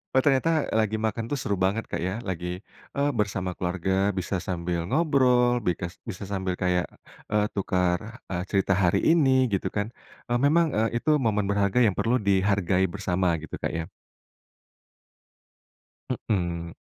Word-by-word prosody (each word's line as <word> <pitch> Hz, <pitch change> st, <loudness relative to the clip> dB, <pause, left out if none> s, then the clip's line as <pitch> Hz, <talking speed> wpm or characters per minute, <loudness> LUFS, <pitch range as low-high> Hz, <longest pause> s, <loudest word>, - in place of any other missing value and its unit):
Oh -, -, +7 dB
ternyata, 150 Hz, +3 st, +2 dB
eee, -, -, -2 dB
lagi 110 Hz, 0 st, +1 dB
makan 110 Hz, +1 st, -1 dB
tuh 145 Hz, -, 0 dB
seru 100 Hz, -, -1 dB
banget 95 Hz, +4 st, 0 dB
Kak -, -, -2 dB
ya, 95 Hz, +5 st, -3 dB
lagi, 90 Hz, 0 st, -3 dB, 0.4 s
eee, 140 Hz, +1 st, +2 dB
bersama 95 Hz, -3 st, -1 dB
keluarga, 95 Hz, +2 st, 0 dB
bisa 95 Hz, +2 st, -3 dB
sambil 85 Hz, -1 st, -2 dB
ngobrol, 125 Hz, -5 st, +3 dB
bikas 90 Hz, 0 st, -2 dB
bisa 100 Hz, -2 st, -6 dB
sambil 95 Hz, -2 st, -1 dB
kayak, 90 Hz, -1 st, +1 dB, 0.5 s
eee, 105 Hz, 0 st, +3 dB
tukar, 90 Hz, -3 st, +1 dB, 0.3 s
eee, 90 Hz, -1 st, -2 dB
cerita 100 Hz, 0 st, +2 dB
hari 85 Hz, -, +3 dB
ini 135 Hz, -6 st, +4 dB
gitu 95 Hz, -, 0 dB
kan, 105 Hz, 0 st, -1 dB, 0.4 s
e -, -, 0 dB
memang, 165 Hz, +3 st, +4 dB
eee, 115 Hz, +2 st, +1 dB
itu 155 Hz, -, -2 dB, 0.2 s
momen 105 Hz, -2 st, +1 dB
berharga 100 Hz, +2 st, +2 dB
yang 100 Hz, -4 st, +2 dB
perlu 115 Hz, +2 st, +1 dB
dihargai 95 Hz, -2 st, +2 dB
bersama 95 Hz, -2 st, -1 dB
gitu, 80 Hz, 0 st, -7 dB
Kak, -, -, -1 dB
ya? 85 Hz, -1 st, -4 dB, 2.4 s
Mhm. 85 Hz, -4 st, -2 dB
100 Hz, 155 wpm, -26 LUFS, 90-115 Hz, 2.4 s, Oh